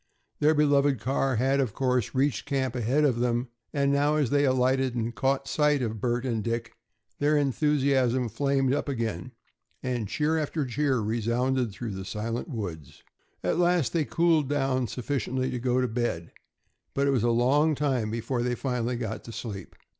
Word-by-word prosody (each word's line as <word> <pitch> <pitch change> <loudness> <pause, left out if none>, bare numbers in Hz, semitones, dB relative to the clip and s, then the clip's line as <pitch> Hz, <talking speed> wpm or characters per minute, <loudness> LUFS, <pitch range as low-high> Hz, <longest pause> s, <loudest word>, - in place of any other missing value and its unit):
Their 155 +2 +4
beloved 145 -3 +3
car 135 +2 0
had, 135 +4 +2
of 125 -7 -1
course, 125 -4 0
reached 140 +2 0
camp 135 -4 -1
ahead 125 +5 +1
of 130 -5 +2
them, 120 0 0 0.2
and 140 -1 +1
now, 145 +2 +2
as 145 -6 +1
they 145 0 +3
alighted 130 0 +2
and 115 0 -2
caught 135 +5 0
sight 150 -3 +2
of 110 -3 -3
Bert 120 +1 0
and 115 -4 -1
Dick, 115 +1 -3 0.5
their 150 +1 +3
enthusiasm 135 -3 +2
flamed 135 +3 +1
up 145 - -1
again, 115 -4 -3 0.5
and 120 -4 -2
cheer 155 +7 0
after 150 -1 -2
cheer 135 +1 0
resounded 120 +3 0
through 110 +3 -6
the 95 -1 -5
silent 115 - -4
woods. 90 - -6 0.4
At - - 0
last 175 -8 +2
they 165 - +2
cooled 165 -4 +2
down 135 -3 0
sufficiently 130 +2 -2
to 125 - -3
go 125 +1 +1
to 125 - +1
bed, 110 -8 -2 0.6
but 140 - +2
it 140 - +3
was 130 -4 +2
a 120 - +2
long 140 +7 +3
time 130 -6 0
before 115 +3 -2
they 125 0 0
finally 125 -2 -2
got 110 -2 -4
to 115 - -8
sleep. 105 -5 -7
130 Hz, 175 wpm, -27 LUFS, 115-140 Hz, 0.6 s, Their